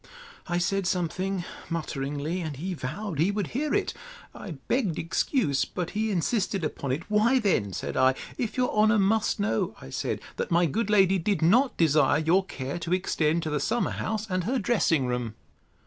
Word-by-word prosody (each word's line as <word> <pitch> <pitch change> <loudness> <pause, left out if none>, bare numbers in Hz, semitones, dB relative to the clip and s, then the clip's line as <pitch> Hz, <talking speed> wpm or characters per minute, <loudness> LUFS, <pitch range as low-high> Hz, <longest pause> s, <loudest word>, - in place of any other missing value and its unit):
I 175 -1 0
said 195 +1 0
something 185 +1 -1 0.2
mutteringly, 150 +1 -3
and 155 -4 -4
he 185 +6 -3
vowed 170 +4 -5
he 170 +5 +3
would 205 -3 -2
hear 295 +4 -2
it. - - 0 0.4
I 195 - -7
begged 210 - +1
excuse; 165 - +1
but 180 -2 -4
he 220 +1 -1
insisted 195 0 0
upon 140 -3 -3
it. 145 +6 -2
Why, 215 +5 +3
then, 185 - +1
said - - -4
I, 130 0 +4 0.2
if 235 -1 -3
your 250 -1 +2
honour 215 +1 +4
must 210 +2 +2
know, 155 - 0
I 65 - -11
said, - - -2 0.2
That - - -2
my 175 +1 +4
good 210 +8 -1
lady 195 -2 +4
did 195 0 0
not 245 +11 +4
desire 150 -3 +4
your 165 +5 +3
care 140 -4 -5
to 170 +1 -2
extend 165 -3 0
to 155 - -3
the 150 - 0
summer 230 - 0
house, 220 -1 -2
and 185 -3 -1
her 255 +5 0
dressing 195 - +2
room. 125 -3 -2
180 Hz, 185 wpm, -27 LUFS, 155-210 Hz, 0.4 s, I